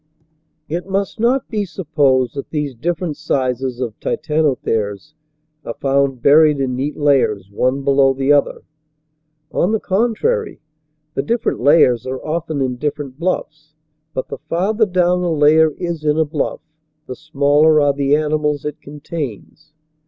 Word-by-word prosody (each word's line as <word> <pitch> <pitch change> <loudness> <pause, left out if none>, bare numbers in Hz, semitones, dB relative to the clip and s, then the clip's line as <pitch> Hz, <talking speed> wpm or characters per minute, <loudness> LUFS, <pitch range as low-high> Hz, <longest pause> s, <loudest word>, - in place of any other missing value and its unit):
It 175 +4 -4
must 195 +2 -2
not 250 +4 +1
be 210 -2 -2
supposed 145 -9 0
that 140 - -6
these 150 -3 -3
different 165 +4 -3
sizes 130 -1 -2
of 115 -4 -4
Titanotheres 145 -6 -1 0.5
are 115 - -6
found 135 -2 0
buried 150 0 +5
in 130 -2 -1
neat 140 +4 -3
layers, 125 -10 +1
one 130 +6 0
below 135 -1 +4
the 135 +2 +2
other. 145 - +1 0.9
On 190 +5 +1
the 220 - +1
contrary, 240 - -1 0.5
the 135 - -1
different 235 - -1
layers 125 -3 +4
are 130 +1 -3
often 155 -3 -2
in 125 -1 -2
different 145 -1 -4
bluffs. 155 -3 -4 0.4
But 130 - -3
the - - -6
farther 195 +8 0
down 180 -1 +1
a 175 - 0
layer 155 +1 +4
is 170 -3 -4
in 150 0 +1
a 160 - +3
bluff, 145 -1 -3 0.4
the 130 - -6
smaller 150 +1 +3
are 145 -1 +3
the 140 +1 +2
animals 150 -1 -1
it 150 +1 -5
contains. 150 0 -8
150 Hz, 145 wpm, -18 LUFS, 135-165 Hz, 0.9 s, buried